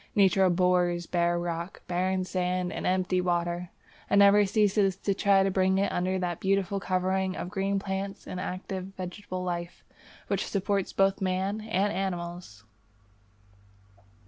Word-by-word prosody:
Nature 195 -2 +4
abhors 180 -1 +2
bare 175 0 +1
rock, 170 +1 -4
barren 185 +1 0
sand, 180 0 -1
and - - -3
empty 185 0 +1
water, 175 0 -1 0.4
and - - +3
never 200 0 +6
ceases 205 -2 +2
to 200 +1 -1
try 195 0 +3
to 195 - +1
bring 190 0 +2
it 200 +1 +1
under 185 +1 0
that 175 -2 -2
beautiful 195 0 0
covering 185 0 0
of 180 - -5
green 195 0 0
plants 195 0 -4
and 180 - -5
active 185 0 -4
vegetable 185 0 -5
life 175 -1 -4 0.4
which 200 0 -1
supports 195 -1 -1
both 195 0 +2
man 190 +3 -1
and 205 -2 0
animals. 175 - -4
185 Hz, 145 wpm, -28 LUFS, 180-195 Hz, 0.4 s, never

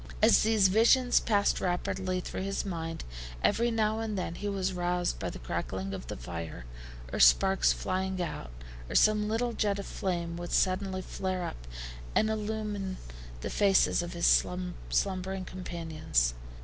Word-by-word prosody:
As - - +6
these 215 -3 +4
visions 235 +5 +5
passed 205 -3 +1
rapidly 185 +1 -1
through - - -5
his 195 +1 -2
mind, 165 -3 -4 0.4
every 235 +1 +3
now 220 -1 +1
and 220 -2 -3
then 180 -2 -2
he 205 +4 -4
was 190 -1 -1
roused 175 0 -1
by - - -2
the - - -7
crackling 95 +10 -4
of 95 -11 -6
the - - -5
fire, 80 0 -6 0.5
or - - -2
sparks - - +5
flying 185 - -2
out, 165 - -4 0.4
or - - -5
some 210 -1 +4
little 235 +2 0
jet 205 -2 0
of 200 - -5
flame 170 -3 -3
would 175 0 -5
suddenly 185 0 +1
flare 185 -1 -3
up - - -7 0.5
and 220 0 +3
illumine 210 -3 -3 0.4
the - - -4
faces 200 -3 +4
of 175 +1 -5
his 170 0 -1 0.6
slumbering 190 -1 -1
companions. 160 - -1
185 Hz, 155 wpm, -30 LUFS, 170-205 Hz, 0.6 s, As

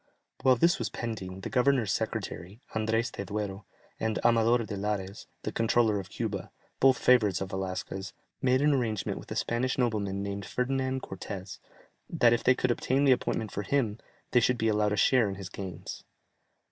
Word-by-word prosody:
While 130 -1 +5
this 170 +8 +3
was - - -2
pending, 95 -5 -5
the - - -5
governor's 125 -5 +3
secretary, 95 +2 -3
Andrès 110 +2 0
de - - -5
Duero, 100 0 -4 0.3
and 110 -1 0
Amador 115 +1 +5
de 105 - -5
Larez, 100 -1 -3 0.2
the - - -2
Controller 115 -2 +2
of 95 -3 -8
Cuba, - - -4 0.3
both 135 -1 +5
favourites 105 -8 +4
of 95 0 -4
Velasquez, 95 0 -4 0.3
made 130 +1 +3
an 150 0 +4
arrangement 115 -6 -1
with - - -12
a - - -4
Spanish 125 +2 0
nobleman 105 -6 0
named 100 0 -4
Ferdinand 130 +1 -1
Cortès, 95 0 -7 0.5
that 120 -1 +4
if 120 - 0
they 130 - +5
could 130 -1 +1
obtain 130 +3 +1
the 140 - +5
appointment 110 -4 0
for 100 - -3
him, 115 -1 0 0.3
they 125 - +5
should 125 +1 +2
be 115 -1 +1
allowed 105 -1 +2
a 105 - 0
share 120 0 +4
in 95 - -4
his 95 -2 -7
gains. 95 -1 -7
110 Hz, 180 wpm, -29 LUFS, 100-125 Hz, 0.5 s, While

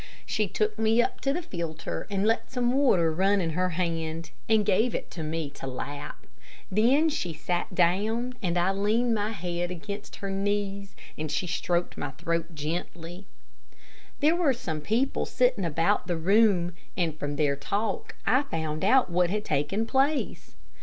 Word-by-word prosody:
She 215 -1 0
took 215 +3 -1
me 225 +1 +3
up 240 - +1
to 275 - +1
the 345 +5 -2
filter 165 - -4
and 200 0 0
let 225 +1 +1
some 245 -2 +1
water 185 - +3
run 195 +4 +3
in 165 -3 0
her 180 +3 +1
hand, 165 -2 -2 0.2
and 220 -2 +4
gave 220 +4 +2
it - - -4
to 170 - -6
me 155 -1 -3
to 135 - -8
lap. 145 +3 -6 0.5
Then 250 +10 +4
she 180 - -2
sat 175 +4 -2
down 215 +8 +2
and 175 -3 0
I 175 +2 +3
leaned 215 +5 +2
my 210 -1 0
head 175 -3 -3
against 200 +4 -6
her 195 -1 -5
knees, 200 0 -2 0.2
and 155 -1 -3
she 155 +5 0
stroked 175 0 -1
my 145 - -2
throat 165 +3 -3
gently. 170 +4 -5 0.9
There 310 +3 +5
were 335 -6 +3
some 160 -11 -4
people 230 - 0
sitting 250 -7 +2
about 165 +5 +1
the 175 -2 0
room, 185 -1 +3 0.2
and, 165 -4 0
from 145 0 -2
their 145 -1 +2
talk, 200 +10 -2
I 255 +6 +4
found 160 - -3
out 260 -8 +4
what 175 0 +3
had 210 +3 -2
taken 150 +10 0
place. 270 - 0
185 Hz, 170 wpm, -27 LUFS, 165-220 Hz, 0.9 s, There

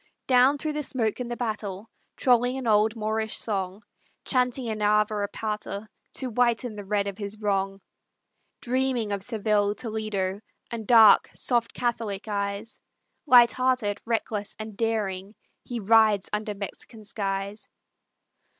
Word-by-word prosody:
Down 255 +2 +5
through 305 +1 -3
the 300 - -2
smoke 235 -6 -1
and 245 -1 -4
the 240 - -4
battle, 215 -3 -4 0.3
Trolling 245 0 +3
an 265 - -5
old 215 0 +3
Moorish 220 0 -1
song, 195 -1 -3 0.4
Chanting 250 -1 0
an 215 -1 -3
Ave 210 +1 +3
or 205 -1 -1
Pater, 210 0 -4 0.3
To 260 - -3
whiten 235 0 +1
the 205 - -7
red 200 0 0
of 200 +1 -5
his 205 +1 -5
wrong, 195 -2 -1 0.8
Dreaming 250 -3 0
of 200 -1 -2
Seville, 210 -1 0
Toledo, 215 -4 -3 0.3
And 225 -3 -5
dark, 225 -4 +7
soft 240 -2 0
catholic 225 -5 -2
eyes, 200 +1 -3 0.5
Light 240 -3 +8
hearted, 255 -5 0
reckless, 220 -3 -2
and 215 -1 -7
daring, 210 -3 -2 0.3
He 240 -1 -4
rides 215 -1 +4
under 210 0 -2
Mexican 215 +3 -8
skies. 200 0 -4
215 Hz, 140 wpm, -26 LUFS, 205-235 Hz, 0.8 s, Light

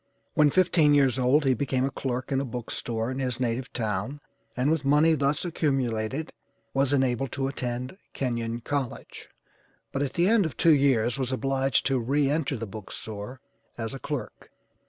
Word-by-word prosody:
When 150 -1 +5
fifteen 165 -3 +4
years 135 -3 +3
old 135 +4 +3
he 135 - +4
became 130 0 0
a 135 - -2
clerk 130 -1 -3
in 135 0 +2
a - - -2
book 120 -2 -5
store 115 +1 -2
in 130 - -4
his 125 -2 -2
native 125 +1 -2
town, 110 +4 -2 0.4
and 130 +4 +2
with 160 -3 +1
money 150 +4 +4
thus 145 +2 0
accumulated, 135 -4 -1 0.4
was 135 0 +2
enabled 130 -2 +1
to 135 -1 -1
attend 125 0 -4 0.2
Kenyon 120 -2 -2
College, 140 -1 -4 0.6
but 140 - -2
at 140 -2 -1
the 175 +2 +2
end 215 -5 +4
of - - -9
two 165 - +6
years 130 -4 +2
was 130 -1 -1
obliged 135 0 +1
to 135 -2 +2
re 140 +4 +1
enter 145 -3 0
the 115 - -4
book 105 -1 -9
store 110 +4 -7 0.4
as 115 +1 -4
a 135 - -6
clerk. 145 -1 -6
135 Hz, 180 wpm, -27 LUFS, 120-145 Hz, 0.6 s, two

